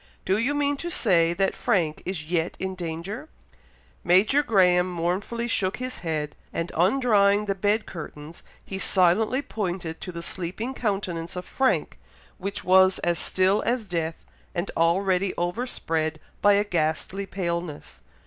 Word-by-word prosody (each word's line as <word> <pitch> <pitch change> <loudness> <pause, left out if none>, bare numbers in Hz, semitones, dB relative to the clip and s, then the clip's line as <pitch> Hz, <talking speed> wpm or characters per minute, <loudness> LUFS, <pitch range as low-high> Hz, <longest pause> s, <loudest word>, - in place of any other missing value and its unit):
"Do 190 +2 +2
you 265 +6 +1
mean 285 0 +1
to 345 - -4
say 175 - +3
that 195 +2 +1
Frank 160 -5 0
is 180 -5 -3
yet 165 +1 -1
in 190 0 -3
danger!" 180 - -5 0.7
Major 195 +11 +4
Graham 185 -7 +3
mournfully 185 +7 -2
shook 190 -5 0
his 255 0 -4
head, 155 -3 -3 0.2
and 165 +1 -3
undrawing 205 +1 +3
the 200 - 0
bed 205 +3 +1
curtains, 155 -1 -9 0.2
he 190 - -5
silently 205 +9 +3
pointed 175 - -4
to 185 - -5
the 170 -1 -6
sleeping 190 +9 -4
countenance 190 -8 -2
of 180 0 -5
Frank, 265 -1 0 0.4
which 195 +2 -4
was 190 +1 +5
as 175 0 +1
still 190 +2 +2
as 240 -1 -1
death, 165 -3 -3 0.3
and 175 +2 -2
already 185 +3 +2
overspread 165 -5 -2 0.2
by 205 - +6
a 200 +1 +3
ghastly 180 +1 -1
paleness. 170 -5 -4
185 Hz, 145 wpm, -25 LUFS, 170-210 Hz, 0.7 s, by